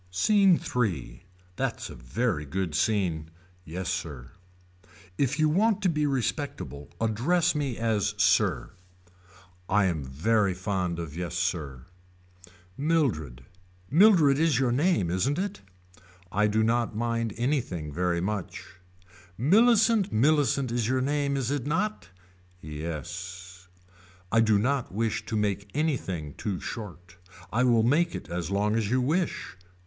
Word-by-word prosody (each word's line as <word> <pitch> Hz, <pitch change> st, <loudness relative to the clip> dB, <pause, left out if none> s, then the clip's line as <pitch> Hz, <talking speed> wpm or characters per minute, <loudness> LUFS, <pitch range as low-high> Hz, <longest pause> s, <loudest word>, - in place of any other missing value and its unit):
SCENE 195 Hz, -, +4 dB, 0.2 s
III. 85 Hz, -, -1 dB, 0.3 s
That's -, -, -3 dB
a -, -, -8 dB
very 75 Hz, -, -2 dB
good 85 Hz, +3 st, -3 dB
scene. 85 Hz, -3 st, 0 dB, 0.3 s
Yes 90 Hz, +2 st, -5 dB
sir. 75 Hz, -9 st, -4 dB, 0.9 s
If 140 Hz, -1 st, +1 dB
you 155 Hz, -1 st, +3 dB
want 205 Hz, +6 st, +2 dB
to 185 Hz, -, +3 dB
be 150 Hz, -2 st, +1 dB
respectable 115 Hz, -, -3 dB
address 145 Hz, +11 st, +1 dB
me 140 Hz, -6 st, -2 dB
as 105 Hz, -2 st, 0 dB
sir. 90 Hz, -, +2 dB, 1.0 s
I 100 Hz, 0 st, +3 dB
am 85 Hz, -6 st, -1 dB
very 95 Hz, +9 st, +1 dB
fond 90 Hz, -2 st, -2 dB
of 80 Hz, -3 st, -6 dB
yes 90 Hz, 0 st, -4 dB
sir. 80 Hz, -7 st, -2 dB, 0.9 s
Mildred. 115 Hz, -, 0 dB, 0.5 s
Mildred 160 Hz, -5 st, +6 dB
is 160 Hz, -6 st, +3 dB
your 130 Hz, -2 st, +2 dB
name 140 Hz, -, +1 dB
isn't 125 Hz, -, 0 dB
it. 200 Hz, +2 st, -3 dB, 0.7 s
I 105 Hz, +2 st, +2 dB
do 110 Hz, +1 st, +1 dB
not 115 Hz, 0 st, 0 dB
mind 115 Hz, -1 st, -1 dB
anything 120 Hz, -, -2 dB
very 90 Hz, 0 st, 0 dB
much. 100 Hz, 0 st, -4 dB, 0.7 s
Millicent 220 Hz, -, +4 dB
Millicent 135 Hz, +1 st, +2 dB
is 120 Hz, -2 st, 0 dB
your 130 Hz, +1 st, +1 dB
name 140 Hz, 0 st, 0 dB
is 130 Hz, -1 st, -1 dB
it 145 Hz, -2 st, -2 dB
not. 185 Hz, -, -1 dB, 0.5 s
Yes. 85 Hz, +4 st, -7 dB, 0.6 s
I 115 Hz, -, +4 dB
do 110 Hz, -2 st, +4 dB
not 130 Hz, +4 st, 0 dB
wish 110 Hz, +3 st, -2 dB
to 110 Hz, -, -1 dB
make 100 Hz, -1 st, -1 dB
anything 95 Hz, -, -2 dB
too 100 Hz, -4 st, -3 dB
short. 90 Hz, -5 st, -8 dB, 0.4 s
I 120 Hz, +3 st, +2 dB
will 115 Hz, -3 st, +4 dB
make 160 Hz, +8 st, +2 dB
it -, -, -7 dB
as 85 Hz, -1 st, -3 dB
long 105 Hz, +2 st, +1 dB
as 110 Hz, -3 st, 0 dB
you 125 Hz, +2 st, +2 dB
wish. 155 Hz, -, -1 dB
110 Hz, 135 wpm, -27 LUFS, 90-140 Hz, 1.0 s, Mildred